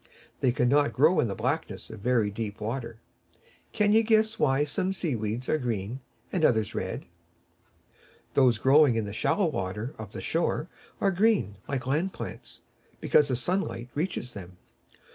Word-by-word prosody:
They 130 - +3
cannot 135 +4 +2
grow 155 +7 +4
in - - +2
the 100 - -3
blackness 125 - -3
of 110 - -9
very 115 -2 +1
deep 105 0 -5
water. 115 +1 -4 0.7
Can 210 0 +2
you 220 - +6
guess 220 0 +2
why 135 0 +3
some 185 +6 -1
sea 165 -8 -1
weeds 110 +3 -3
are 155 - +1
green 115 -1 -3 0.3
and 180 - 0
others 110 -7 +2
red? - - -4 1.3
Those 125 -4 +4
growing 135 +1 +5
in 110 -2 0
the 100 - -6
shallow 195 - +1
water 110 - -3
of 110 - -8
the - - -6
shore 165 -1 -1 0.3
are 195 - +2
green, 190 - +2
like 135 -3 -3
land 160 +8 0
plants, - - -8 0.4
because 150 - +4
the 130 - 0
sunlight 125 -3 -2
reaches 150 -6 -3
them. 90 -3 -10
130 Hz, 160 wpm, -27 LUFS, 110-160 Hz, 1.3 s, you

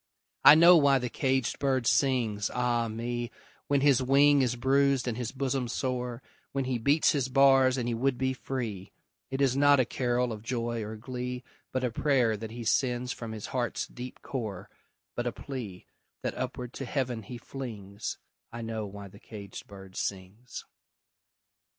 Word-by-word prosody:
I 145 - +11
know 170 +2 +8
why 140 -3 +5
the 125 -2 -3
caged 130 -3 0
bird 130 -3 +1
sings, 115 -7 +2
ah 120 -1 +1
me, 120 +2 -3 0.4
When 140 -1 +2
his 140 -2 +4
wing 140 +2 +5
is 125 -2 +1
bruised 135 +1 +2
and 120 - -1
his 120 -1 -4
bosom 135 -1 -1
sore, 125 -1 -3 0.3
When 135 -1 -1
he 125 -2 -1
beats 145 +7 +3
his 135 -3 0
bars 135 -1 +5
and 120 -2 -2
he 120 - 0
would 130 +2 0
be 130 0 0
free; 115 -8 -5 0.4
It 135 +1 -3
is 135 -2 +3
not 145 0 +5
a 130 - +4
carol 125 -1 0
of 105 - -8
joy 115 0 -2
or 110 +1 -6
glee, 125 +2 -5 0.3
But 130 0 -1
a 125 - 0
prayer 125 -3 +2
that 110 +1 -6
he 120 +2 -7
sends 125 +1 +1
from 115 -3 -6
his 110 -2 -6
heart's 125 -2 -1
deep 125 +1 -9
core, 105 -6 -5 0.4
But 120 0 -2
a - - 0
plea, 110 -5 -7 0.4
that - - -1
upward 125 -1 -5
to 135 - -5
Heaven 125 -3 -2
he 120 +4 -8
flings 110 -5 -6 0.3
I 115 0 -6
know 110 -2 -4
why 100 0 -9
the 100 +1 -15
caged 100 -3 -9
bird 95 -1 -12
sings! 100 +6 -5
125 Hz, 175 wpm, -29 LUFS, 115-135 Hz, 0.4 s, I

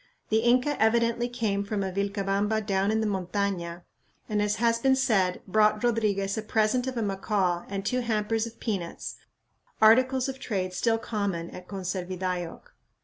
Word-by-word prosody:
The 220 - +3
Inca 250 +4 +2
evidently 235 +2 +2
came 220 -5 -1
from 200 0 -2
a 190 - -2
Vilcabamba 200 +2 0
down 195 -1 +1
in 220 +1 +1
the - - 0
montaña, 185 -3 -2 0.4
and, 210 -2 0
as 210 0 +1
has 230 0 +2
been 265 +2 +4
said, 195 -9 +1
brought 215 +2 +3
Rodriguez 210 -4 +1
a - - -2
present 220 +4 +1
of 260 -2 -3
a 230 - 0
macaw 195 -3 0
and 195 0 -4
two 255 +4 +1
hampers 225 -1 0
of 230 - -12
peanuts, 190 -7 -4 0.6
articles 255 +4 +5
of 265 0 -5
trade 185 -7 -2
still 225 +4 +1
common 200 -7 -3
at 180 0 -10
Conservidayoc. 185 -2 -3
210 Hz, 160 wpm, -27 LUFS, 195-230 Hz, 0.6 s, articles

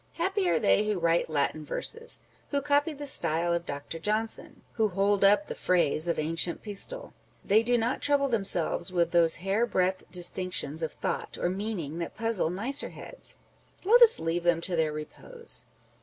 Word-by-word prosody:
Happy 380 +2 0
are - - +3
they 210 -1 +3
who 210 -3 0
write 170 0 +1
Latin 155 +1 -1
verses! 460 - -2
â€" - - -34
who 285 -1 0
copy 290 +2 +2
the 290 -1 -7
style 170 - +3
of 170 0 -2
Dr. 145 +3 -6
Johnson! 215 +5 -2
â€" - - -34
who 220 -1 +3
hold 200 +1 +1
up 205 +9 +5
the - - -6
phrase 170 -3 +1
of 170 - 0
ancient 165 +2 -1
Pistol! 485 - -2 0.3
They 210 +3 +4
do 240 +1 +2
not 235 +3 -1
trouble 285 -1 +2
themselves 195 -6 0
with 170 -2 +1
those 170 -2 +4
hair 210 +5 +1
breadth 185 -1 0
distinctions 175 -3 -1
of 160 - -3
thought - - -4
or 175 - 0
meaning 185 -6 -4
that 170 - -6
puzzle 225 -6 0
nicer 230 +11 -2
heads; - - -8 0.5
â€" 390 - -2
let 485 +1 +7
us 460 -1 +8
leave 165 +2 -1
them 170 -1 +2
to 175 +1 -1
their 160 -2 +1
repose 455 - -4
195 Hz, 185 wpm, -28 LUFS, 170-245 Hz, 0.5 s, us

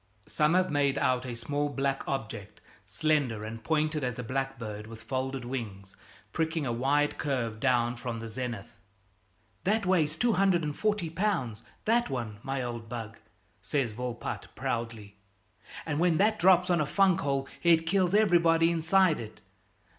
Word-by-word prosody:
Some 150 +3 +2
have 185 -2 +2
made 140 -1 +2
out 130 -1 +1
a 120 - -4
small 145 +4 -2
black 135 -1 -2
object, 110 -6 -5 0.3
slender 135 -3 0
and 115 +1 -7
pointed 155 +2 0
as 125 -1 -2
a 125 - -4
blackbird 120 -4 -4
with 115 0 -11
folded 130 -1 -3
wings, 100 -7 -6 0.4
pricking 160 -1 -1
a 120 - -1
wide 145 +5 +1
curve 120 -7 -2
down 120 -2 +2
from 120 -1 -5
the 115 - -6
zenith. 115 -2 -6 0.8
"That 210 +2 +1
weighs 160 -5 +2
240 195 -3 +1
lb., 160 - -1 0.2
that 235 +2 +2
one, 115 -5 -4
my 135 +1 -3
old 120 -2 -5
bug," 115 -2 -6 0.4
says 135 -6 -1
Volpatte 120 +1 -5
proudly, 115 -3 -4 0.7
"and 145 - -1
when 170 -2 +3
that 215 +2 +3
drops 180 0 +5
on 170 -3 +3
a 150 - 0
funk 190 +2 +3
hole 140 -1 -1
it 165 -1 +4
kills 185 +2 +2
everybody 170 -5 +4
inside 170 +1 +3
it. 110 -1 -9
135 Hz, 150 wpm, -29 LUFS, 120-165 Hz, 0.8 s, drops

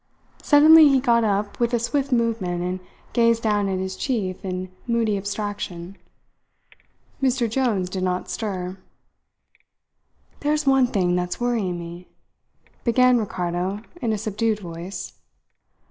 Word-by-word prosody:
Suddenly 310 +1 +7
he 270 -1 +4
got 235 -3 +3
up 205 -1 -1
with 240 0 +1
a - - +1
swift 275 +4 -1
movement 225 -8 0
and 180 +1 -2 0.3
gazed 230 -1 +3
down 205 -2 +1
at 190 - -1
his 190 0 -3
chief 205 -9 -2
in 185 -1 -4 0.2
moody 230 -3 +1
abstraction. 200 -3 -4 1.3
Mr. 255 -2 +2
Jones 225 -6 0
did 185 +1 -4
not 185 0 -1
stir. 185 -3 -4 1.6
"There's 300 +1 0
one 270 -2 +4
thing 185 -7 +1
that's 180 0 -2
worrying 225 -7 -1
me," 170 +1 -9 0.8
began 250 +1 +4
Ricardo 185 -1 -2 0.2
in 230 - 0
a 215 - 0
subdued 215 +1 -1
voice. 175 0 -7
210 Hz, 130 wpm, -23 LUFS, 185-240 Hz, 1.6 s, Suddenly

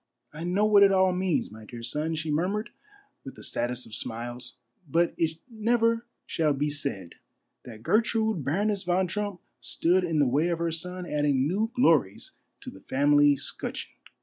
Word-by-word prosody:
I 155 +2 -7
know 185 +4 +1
what 210 -1 +6
it 200 -1 +7
all 190 -1 +4
means, 180 - 0
my 110 0 -11
dear 115 +2 -9
son," 150 +7 -1
she 155 0 -3
murmured 195 +9 -1 0.5
with - - -9
the - - -12
saddest 120 +1 -2
of 110 - -14
smiles; 120 +3 -5 0.2
" - - -54
but 170 +4 +2
it 160 -1 -1
never 230 0 +1 0.2
shall 155 -3 +1
be 145 +2 -1
said 135 - -4 0.5
that 110 -3 -11
Gertrude 220 - +1
Baroness 200 +8 0
von 180 0 +1
Trump 200 -1 -4 0.2
stood 180 +2 +1
in 165 -3 -1
the 145 - +4
way 145 +6 +2
of 170 -1 0
her 170 0 -1
son 180 +3 -4
adding 145 -4 +1
new 210 +7 0
glories 150 - +2 0.3
to - - -8
the 95 - -14
family 145 +1 +4
'scutcheon. - - -6
165 Hz, 175 wpm, -27 LUFS, 140-195 Hz, 0.5 s, it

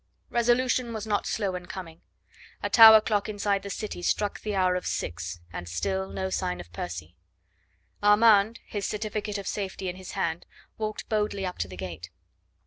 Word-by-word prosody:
Resolution 240 0 +2
was 220 -1 -4
not 210 -2 0
slow 200 -4 -1
in 180 -1 -6
coming. 170 -3 -8 0.6
A - - -1
tower 220 -2 +10
clock 210 -1 0
inside 200 -1 0
the 200 - -7
city 205 -2 -5
struck 205 +3 0
the 210 -1 -3
hour 185 -1 +3
of 180 - -3
six, 85 +1 -4
and 85 0 -6
still 190 - -2
no 190 0 -3
sign 180 -1 -1
of 85 -1 -11
Percy. 85 -1 -6 0.9
Armand, 210 +1 +5
his 205 -2 -3
certificate 210 -1 -3
of 200 - -6
safety 190 -2 -3
in 180 - -6
his 185 -1 -9
hand, 175 -4 -2 0.3
walked 215 -1 -3
boldly 210 -2 -1
up 180 - -5
to - - -1
the 90 0 -10
gate. 85 -1 -6
195 Hz, 175 wpm, -27 LUFS, 175-215 Hz, 0.9 s, tower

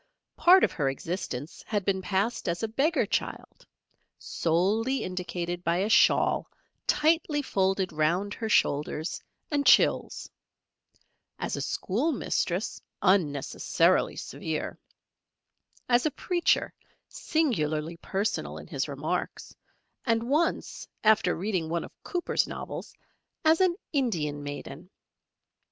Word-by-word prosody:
Part 370 +2 +6
of - - +3
her 140 -4 0
existence 145 -1 -5
had 205 -4 -1
been 190 -1 +1
passed 195 +2 -1
as 170 +5 -2
a - - +1
Beggar 275 +10 +1
Child - - -4 0.5
solely 210 +11 0
indicated 175 -1 -4
by 170 0 +1
a 200 +4 0
shawl - - +4 0.4
tightly 305 -1 +2
folded 190 - 0
round 170 +7 +1
her 225 - -4
shoulders 150 -2 +1 0.3
and 290 -1 +1
chills, - - +4 1.1
as - - -3
a - - -3
Schoolmistress, 215 - -1 0.2
unnecessarily 155 -8 +2
severe; 160 -1 -4 1.1
as 245 +4 +3
a 300 - -5
Preacher, 350 -2 +1 0.3
singularly 165 - -1
personal 200 +5 -2
in - - -9
his - - -3
remarks, - - -4 0.5
and 230 -2 +1
once, 305 +6 0 0.2
after 215 -4 +4
reading 180 -3 -2
one 170 0 -1
of - - -10
Cooper's 355 -2 -1
novels, - - -7 0.5
as 320 +3 +5
an 365 -2 +3 0.2
Indian 165 - 0
Maiden. 145 +3 -7
190 Hz, 110 wpm, -28 LUFS, 170-255 Hz, 1.1 s, Part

